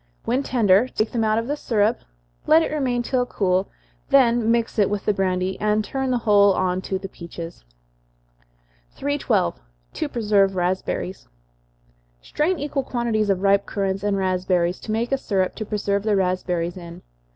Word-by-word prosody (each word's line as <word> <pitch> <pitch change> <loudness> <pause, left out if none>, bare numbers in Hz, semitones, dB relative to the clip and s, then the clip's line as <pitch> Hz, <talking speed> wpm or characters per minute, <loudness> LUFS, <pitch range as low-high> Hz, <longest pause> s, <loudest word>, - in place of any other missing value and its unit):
When 250 +4 +1
tender, 230 -4 +3
take 215 -3 -2
them 230 -2 0
out 215 0 +2
of 230 - -1
the 290 +4 -2
syrup, 225 -5 +1 0.5
let 320 +1 +6
it - - -3
remain 255 -5 0
till 250 +1 0
cool, 190 -3 0 0.4
then 240 -4 +4
mix 230 -1 0
it 205 - +4
with 205 -1 -3
the 210 - +2
brandy, 185 -1 -1
and 210 0 +1
turn 265 +4 -2
the 250 - +2
whole 205 -3 +4
on 185 0 0
to 190 - 0
the 195 +1 -7
peaches. 170 - -9 1.3
312. 270 -9 0 0.3
To 310 - -3
Preserve 205 -6 +2
Raspberries. 185 +1 -2 0.9
Strain 315 - -1
equal 285 -1 -2
quantities 235 -5 -1
of 195 -1 0
ripe 200 0 +3
currants 195 -2 -2
and 205 -1 0
raspberries, 185 -2 0
to 220 - -6
make 230 +3 -1
a 270 - +1
syrup 190 -6 0
to 215 - -5
preserve 200 -1 -1
the 210 0 +1
raspberries 180 -2 -1
in. 170 -1 -10
205 Hz, 165 wpm, -23 LUFS, 190-240 Hz, 1.3 s, let